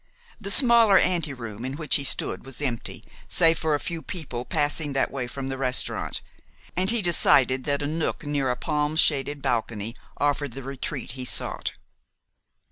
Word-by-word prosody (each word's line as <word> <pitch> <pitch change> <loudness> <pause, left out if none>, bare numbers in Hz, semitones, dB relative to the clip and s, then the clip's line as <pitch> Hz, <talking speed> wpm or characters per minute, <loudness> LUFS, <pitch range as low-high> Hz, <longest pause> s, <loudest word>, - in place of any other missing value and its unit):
The 200 - -6
smaller 230 -3 +7
anteroom 130 - -1
in 130 +1 -4
which 155 +2 +1
he 140 - -1
stood 140 - -1
was 135 -2 -10
empty, 125 -6 -4 0.3
save 165 -2 +4
for 155 -2 +1
a - - -2
few 165 +5 -4
people 135 -10 -6
passing 145 +1 0
that 135 - 0
way 130 -3 -4
from 135 +2 -6
the 135 0 -5
restaurant, 130 -1 +1 0.5
and 185 +2 +1
he 230 -2 +2
decided 130 -6 +4
that 145 0 -1
a - - -1
nook 160 0 -3
near 145 -3 -1
a 125 - 0
palm 150 +1 -2
shaded 145 -3 +2
balcony 115 -1 -2 0.2
offered 145 -2 -1
the 135 - -7
retreat 135 -2 -5
he 130 +1 -6
sought. - - -1
145 Hz, 170 wpm, -25 LUFS, 130-160 Hz, 0.5 s, smaller